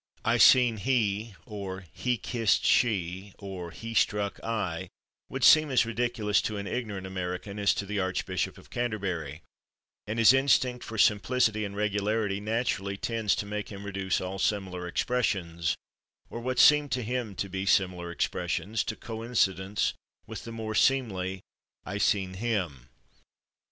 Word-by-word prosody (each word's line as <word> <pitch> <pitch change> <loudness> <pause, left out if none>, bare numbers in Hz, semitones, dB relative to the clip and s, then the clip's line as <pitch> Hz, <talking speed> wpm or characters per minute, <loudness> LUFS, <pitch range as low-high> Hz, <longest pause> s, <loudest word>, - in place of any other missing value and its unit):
"I - - +3
seen 125 -4 +6
/he/" 110 -2 0
or 95 -4 -6
"he 125 -1 -1
kissed 115 -1 +1
/she/" 95 -4 +1
or 95 -3 -7
"he 115 +6 -7
struck 105 -2 +1
/I/" 95 -6 -3 0.4
would - - -4
seem 155 -1 +7
as 125 -4 +3
ridiculous 115 -3 0
to 110 - -3
an 100 - -4
ignorant 100 -2 -4
American 95 +2 -4
as 100 - +3
to 100 - -3
the 105 +1 -2
Archbishop 95 0 -2
of - - -17
Canterbury, 95 - -3 0.6
and 110 +2 -3
his 115 +2 +7
instinct 130 -2 +2
for 110 - -7
simplicity 110 +1 +3
and 100 -1 -5
regularity 105 0 0
naturally 105 -2 -1
tends 115 -1 0
to - - -3
make 105 0 -4
him 100 0 -8
reduce 95 -2 -1
all 95 +1 -5
similar 95 -3 -1
expressions, 90 -7 0 0.6
or 115 - -5
what 125 +1 -3
seem 150 +1 +6
to 125 -1 -1
him 120 -3 -3
to 100 - -2
be 95 +1 -4
similar 90 -3 +2
expressions, 105 +5 -1
to - - -3
coincidence 110 -5 -1 0.3
with - - -8
the 115 - -7
more 110 -1 -4
seemly 95 -8 +1 0.4
"I 100 - -4
seen 95 -3 +1
/him 90 - -2
105 Hz, 150 wpm, -28 LUFS, 95-115 Hz, 0.6 s, seem